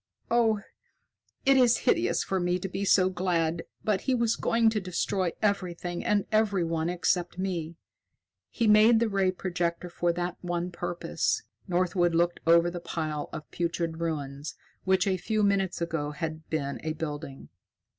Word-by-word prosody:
"Oh, 225 -3 +3 0.9
it 275 0 +6
is 245 -2 +5
hideous - - +2
for 190 - -1
me 175 0 +1
to 185 - -4
be 195 +1 -4
so 185 -1 +5
glad, 175 -3 0 0.2
but 210 -3 +1
he 260 - +1
was 235 -2 +1
going 230 -1 +2
to 215 -2 -1
destroy 185 0 -1
everything 180 -4 -1
and 205 -1 +1
everyone 175 -7 +1
except 175 0 0
me. 175 -4 -3 0.7
He 235 - -1
made 215 +2 +6
the 230 - +2
ray 195 -2 +2
projector 175 -1 -2
for 175 0 +1
that 175 +1 -3
one 175 0 -2
purpose." 175 0 -2 0.2
Northwood 175 -1 +1
looked 175 +1 +2
over 170 +1 +5
the 175 - -5
pile 155 -3 -4
of 155 - -8
putrid 170 -1 -2
ruins 145 -3 -4 0.3
which 190 -1 +3
a 190 -2 +1
few 215 +4 0
minutes 195 -3 +1
ago 165 -3 -2
had 155 +1 -5
been 140 -3 -2
a 155 0 -1
building. 150 -3 -6
175 Hz, 155 wpm, -28 LUFS, 165-195 Hz, 0.9 s, it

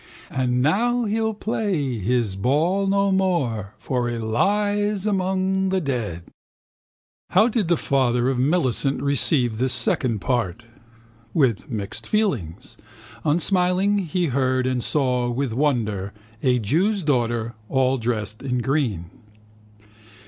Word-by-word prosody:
And 125 -1 0
now 240 - +2
he'll 220 +1 -1
play 185 - -2
his 110 -1 0
ball 160 - +1
no 200 0 +2
more 135 - 0
For 125 -2 -2
he 120 - -3
lies 205 - 0
among 190 -1 0
the 190 0 +1
dead. 115 - -3 1.1
How 210 +5 +4
did 225 -6 0
the 170 -1 +2
father 125 -4 +1
of 130 -2 0
Millicent 135 -2 +1
receive 130 -4 +1
this 130 0 +3
second 120 0 +2
part? 115 0 -2 0.7
With 135 - +1
mixed 105 -5 -5
feelings. 130 - -2 0.5
Unsmiling, 180 +5 +2
he 180 -2 -1
heard 130 0 +1
and 130 -2 -1
saw 125 -4 0
with 125 0 -2
wonder 110 -8 -1 0.3
a 125 -1 +2
jew's 175 - 0
daughter, 120 -5 0 0.2
all 130 0 +1
dressed 110 -2 -2
in 125 -2 -2
green. 125 - -1
135 Hz, 120 wpm, -23 LUFS, 120-185 Hz, 1.1 s, How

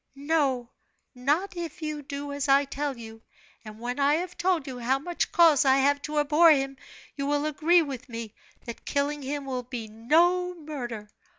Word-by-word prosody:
"No, 275 -4 0 0.4
not 295 +10 0
if 340 -1 -6
you 305 -1 -3
do 285 +1 -6
as 285 -1 -2
I 275 +1 +5
tell 280 -1 -3
you; 225 -1 -10 0.4
and 215 -1 -11
when 245 +4 -4
I 285 +1 +4
have 355 +2 -4
told 350 -5 0
you 255 -2 -7
how 250 +3 +1
much 345 +5 -3
cause 325 -5 +5
I 265 -1 +4
have 285 +1 +2
to 300 +1 -4
abhor 300 +3 +5
him, 275 -3 +2 0.4
you 275 -1 -3
will 290 +1 0
agree 320 +3 +3
with 270 -3 -7
me 230 -2 -6 0.3
that 235 - -8
killing 290 +1 -1
him 280 +1 -4
will 255 -2 -3
be 245 -2 -7
no 340 +11 +2
murder! 250 -10 -6
285 Hz, 185 wpm, -27 LUFS, 255-310 Hz, 0.4 s, I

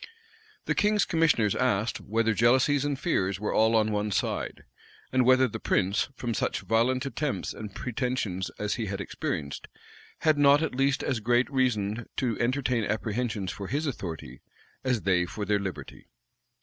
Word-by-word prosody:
[*] 440 -1 -30
The - - +1
king's 210 0 +2
commissioners 150 - +2
asked, 115 -3 0
whether 115 +1 +1
jealousies 130 +6 +3
and 145 -1 -1
fears 100 - 0
were 105 - -2
all 110 +1 +4
on 110 -1 +3
one 105 0 -1
side; 100 - -2 0.5
and 130 -1 +3
whether 130 0 +6
the 110 - -6
prince, 100 +6 +1
from 120 -2 -3
such - - -1
violent 125 +3 +1
attempts 140 - -2
and 105 -2 -8
pretensions 120 -7 -2
as 105 0 -1
he 115 -3 -3
had 100 +1 -4
experienced, 75 -6 -4 0.5
had 155 -2 +3
not 145 +2 +6
at 160 - -2
least 135 +2 +1
as 130 -4 0
great 120 +3 +2
reason 115 -4 0
to 125 -4 0
entertain 125 -1 +1
apprehensions 105 -2 -2
for 95 0 -7
his 145 +8 -1
authority, 80 - -5 0.4
as 125 -4 0
they 90 -2 +2
for 105 +3 -5
their 105 0 +2
liberty? 90 -8 -7
115 Hz, 165 wpm, -27 LUFS, 100-130 Hz, 0.5 s, whether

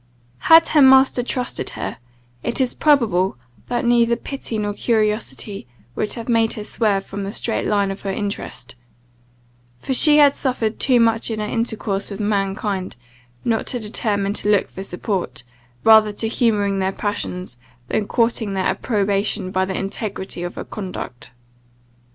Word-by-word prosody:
Had 325 0 +8
her 305 - +4
master 265 -1 +6
trusted 250 0 -3
her, - - -5 0.4
it 235 - -2
is 255 -2 +1
probable 210 - +2 0.3
that 240 0 -1
neither 235 0 +3
pity 265 -3 -5
nor 205 -1 -2
curiosity 215 - -1 0.3
would 210 - -2
have 230 -1 -7
made 225 -2 +2
her 210 - -6
swerve 205 -3 0
from 200 0 -6
the 195 - -4
straight 225 +1 -1
line 200 -2 +1
of 195 - -7
her 200 - -4
interest; 195 - -5 1.0
for 265 - -3
she 295 +3 +7
had 285 -2 +6
suffered 235 -5 -1
too 255 -3 +3
much 225 0 +2
in 220 -1 -3
her 210 - -2
intercourse 215 -3 -2
with 200 0 -7
mankind, 195 -2 -2 0.5
not 225 -2 0
to 250 - -1
determine 205 -2 -1
to 210 - -1
look 205 -2 +2
for 190 - -7
support, 190 - -3 0.4
rather 220 -1 +6
to 215 +2 -2
humouring 205 -4 +1
their 190 0 0
passions, 185 -7 -4 0.3
than 205 - -1
courting 230 -3 0
their 190 - -1
approbation 200 -3 -1
by 185 0 +1
the 190 0 -4
integrity 195 -2 -4
of 175 +1 -5
her - - -6
conduct. 185 - -7
210 Hz, 155 wpm, -20 LUFS, 195-235 Hz, 1.0 s, Had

